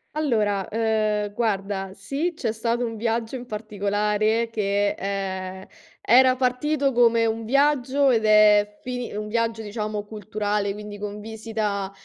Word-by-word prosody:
Allora, 215 -10 0
ehm, 215 -2 0
guarda 195 -3 -2
sì, 280 - -2
c'è 235 -8 -2
stato 230 +2 -1
un 225 -1 -5
viaggio 230 +2 -1
in 250 -1 -7
particolare 210 +1 0
che, 205 -2 +1
ehm, 190 -1 -4 0.4
era 255 +2 +5
partito 270 +3 +1
come 235 -2 +4
un 225 0 -2
viaggio 275 +1 +3
ed 225 -3 +2
è 210 -1 +5
fini 245 -1 -4
un 210 0 -4
viaggio 225 0 -1
diciamo 210 0 -4
culturale, 210 -1 -2
quindi 210 0 -8
con 205 0 -5
visita, 215 -2 -3
215 Hz, 135 wpm, -24 LUFS, 205-235 Hz, 0.4 s, era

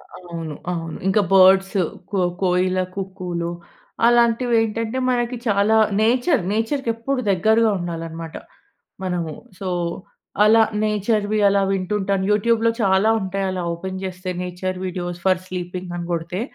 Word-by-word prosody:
అవును. 170 -3 -7 0.2
అవును. 165 -2 -4
ఇంకా 195 +2 +3
బర్డ్స్ 190 +1 +6 0.4
కో 200 - 0 0.2
కోయిల 185 0 +2 0.2
కుక్కూలు. 185 -3 -4 0.6
అలాంటివేంటంటే, 230 -1 +2
మనకి 245 0 0
చాలా 205 +1 +3 0.3
నేచర్ 245 - +3
నేచర్‌కి 230 +4 -1
ఎప్పుడు 255 +3 -2
దగ్గరగా 220 +5 +3
ఉండాలన్నమాట 165 -1 -6 0.7
మనము. 175 -4 -2 0.3
సో, 195 - -4 0.8
అలా 220 +1 +6 0.2
నేచర్‌వి 210 0 0
అలా 200 0 +2
వింటుంటాను. 195 0 -1
యూట్యూబ్‌లో 230 +2 +2
చాలా 195 +1 +3
ఉంటాయి. 195 +1 -2
అలా 185 -1 -3
ఓపెన్ 190 +2 -6
చేస్తే 185 0 -5
నేచర్ 180 +1 -4
వీడియోస్ 175 -1 -4
ఫర్ 185 -1 +3
స్లీపింగ్ 180 0 -5
అని 170 -1 -5
కొడితే 170 +3 -2
190 Hz, 120 wpm, -21 LUFS, 180-220 Hz, 0.8 s, బర్డ్స్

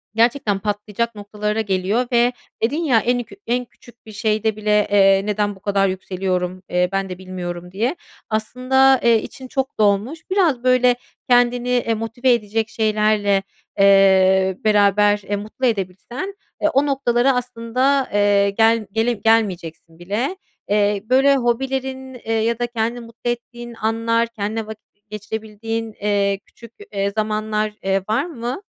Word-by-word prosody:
gerçekten 225 -3 +2
patlayacak 210 +2 -3
noktalara 210 +1 -3
geliyor 200 +4 0
ve 240 +1 +3 0.3
dedin, 250 +7 +1
ya, 245 -7 +4
en 245 +2 0
kü 225 - -15
en 245 +1 0
küçük 240 0 -20
bir 215 - -11
şeyde 215 0 0
bile, 210 -1 +1
eee, 195 -1 +5
"Neden 205 -1 -1
bu - - -17
kadar 195 -1 +1
yükseliyorum, 185 -1 -3
eee, 180 0 +1
ben 195 -1 -1
de 180 - -6
bilmiyorum," 180 -1 -7
diye 230 - -1 0.3
aslında, 255 +4 +3
eee, 230 -2 +4
için 260 - -10
çok 265 +1 -3
dolmuş. 210 +9 +1
Biraz, 335 -11 +2
böyle, 255 -1 +4 0.3
kendini, 245 0 +3
eee, 245 -2 +1
motive 230 +3 +1
edecek 220 0 -1
şeylerle, 210 -3 +1 0.4
eee, 190 -1 +5
beraber, 205 -1 +3
eee, 205 - +1
mutlu 215 +6 -4
edebilsen, 230 - -3 0.3
eee, 310 - +3
o 275 +2 +3
noktalara 265 -2 +2
aslında, 250 +3 0
eee, 205 -1 +3
gel 225 +2 +2
gele 225 +3 +1
gelmeyeceksin 185 -7 -1
bile. 210 - -2 0.3
Eee, 205 -1 +1
böyle, 270 +2 +5
hobilerin, 265 +1 -2
eee, 225 -2 -5
ya 225 +1 0
da 240 - 0
kendini 235 0 -2
mutlu 230 +1 -6
ettiğin 240 0 -8
anlar, 230 +1 0
kendinle 220 -1 -4
vakit 220 0 -11 0.2
geçirebildiğin, 220 +1 -5
eee, 200 -1 +1
küçük, 235 -1 -16 0.2
eee, 200 0 0
zamanlar, 215 0 -1
eee, 195 0 +1
var 220 - +1
mı? 255 -1 -5
220 Hz, 145 wpm, -20 LUFS, 200-240 Hz, 0.4 s, eee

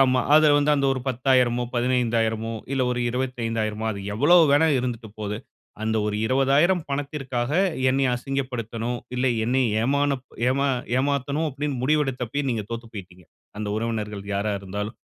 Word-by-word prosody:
ஆமா 130 -1 +4
அத 155 0 +6
வந்து 145 +1 +2
அந்த 140 -1 +1
ஒரு 130 - -3
10,000, 125 -1 +2
15,000, 115 -2 0 0.2
இல்ல 135 -1 +1
ஒரு 125 0 -1
25,000, 115 -4 -2
அது 100 -2 -5
எவ்ளோ 145 +11 +5
வேணா 145 +3 +4
இருந்துட்டு 120 -3 -4
போது. 105 0 -3 0.5
அந்த 110 0 0
ஒரு 105 0 -1
20,000 140 +8 +3
பணத்திற்காக, 135 -3 -3 0.4
என்னய 135 -1 +2
அசிங்கப்படுத்தணும். 125 -3 -3 0.2
இல்ல 125 +1 +1 0.2
என்னை 130 +2 +2 0.2
ஏமான 140 +3 +1 0.3
ஏமா 140 +2 +1 0.3
ஏமாத்தணும் 140 +3 0
அப்டின்னு 140 -1 -3
முடிவெடுத்தப்பவே 135 -2 0
நீங்க 110 -3 -2
தோத்து 115 0 -5
போயிட்டீங்க. 90 -3 -10 0.3
அந்த 105 -1 -3
உறவினர்கள் 105 -3 -3
யாரா 100 +2 0
இருந்தாலும். 105 +3 -5
125 Hz, 140 wpm, -24 LUFS, 115-140 Hz, 0.5 s, அத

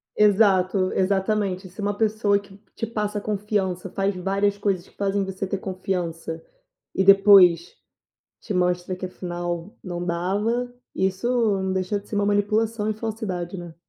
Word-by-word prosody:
Exato, 195 -3 +3
exatamente. 190 0 0
Se 195 +4 -9
uma 205 0 -1
pessoa 215 -2 +2
que 200 -1 -15 0.2
te 225 - -2
passa 210 -2 -2
confiança, 200 -3 -2
faz 195 +1 -1
várias 195 +2 0
coisas 195 -3 -1
que - - -24
fazem 200 0 0
você 190 0 -4
ter 195 +1 -2
confiança, 175 -4 -4 0.5
e 190 - +2
depois 195 -3 +6 0.7
te 210 - -5
mostra 180 0 0
que 185 0 -5
afinal 175 +2 -5
não 175 -2 -4
dava, 205 +8 -1 0.2
isso 190 +5 0 0.3
não 190 0 -1
deixa 190 +2 -1
de 200 - -15
ser - - -5
uma 205 0 +1
manipulação 210 +2 +1
e 215 - 0
falsidade, 210 -5 -4
né. 175 -2 -9
195 Hz, 150 wpm, -24 LUFS, 185-205 Hz, 0.7 s, depois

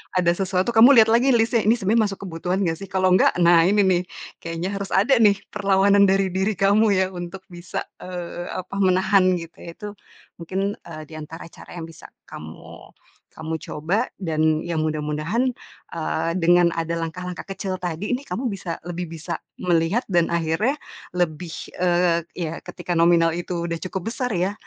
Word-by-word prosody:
ada 175 -2 +3
sesuatu 190 +3 0
kamu 245 +5 +8
lihat 220 - +3
lagi 250 +4 +4
list-nya, 230 0 +2
"Ini 225 - +5
sebenarnya 220 +3 +2
masuk 195 - -8
kebutuhan 180 +3 -2
nggak 165 -3 -1
sih?" - - -7
Kalau 185 0 +2
nggak, 185 - +3
nah 170 -1 +6
ini 205 +1 +4
nih, 180 -1 +2 0.4
kayaknya 165 +2 -4
harus 200 0 -5
ada 215 +8 +4
nih 205 -2 +6 0.2
perlawanan 200 0 +4
dari 195 -1 +2
diri 190 +2 0
kamu 200 +4 +3
ya 185 0 +2
untuk 180 +1 -7
bisa, 175 0 -5 0.2
eee, 175 -1 -6
apa, 185 +2 -6
menahan 185 0 +3
gitu 165 0 -11
ya. 170 - -7
Itu 210 - -6 0.5
mungkin, 190 +4 -2
eee, 155 -2 -9
di - - -12
antara 160 +2 -9
cara - - -13
yang 165 - -5
bisa 165 - -13 0.2
kamu 80 +1 -11 0.4
kamu 160 +1 -4
coba 165 +8 -2 0.2
dan 155 -2 +1
ya 170 -1 -2
mudah-mudahan, 155 +7 -1 0.5
eee, 165 0 -2
dengan 175 0 +4
ada 165 0 -2
langkah-langkah 180 +1 -5
kecil 190 -1 -4
tadi 180 +6 -3
nih 255 - -6
kamu 230 +9 -3
bisa 185 -4 -5
lebih 175 -1 -5
bisa 160 -1 -5 0.2
melihat 175 +6 +1
dan 175 -2 +2
akhirnya 170 - 0 0.4
lebih 170 0 -1 0.3
eee, 175 -1 +2 0.2
ya 165 -2 -4
ketika 180 0 -5
nominal 165 -1 +4
itu 175 0 -3
udah 170 - -2
cukup 190 +4 -4
besar 250 -2 -2
ya, 185 +3 0
180 Hz, 175 wpm, -23 LUFS, 165-195 Hz, 0.5 s, kamu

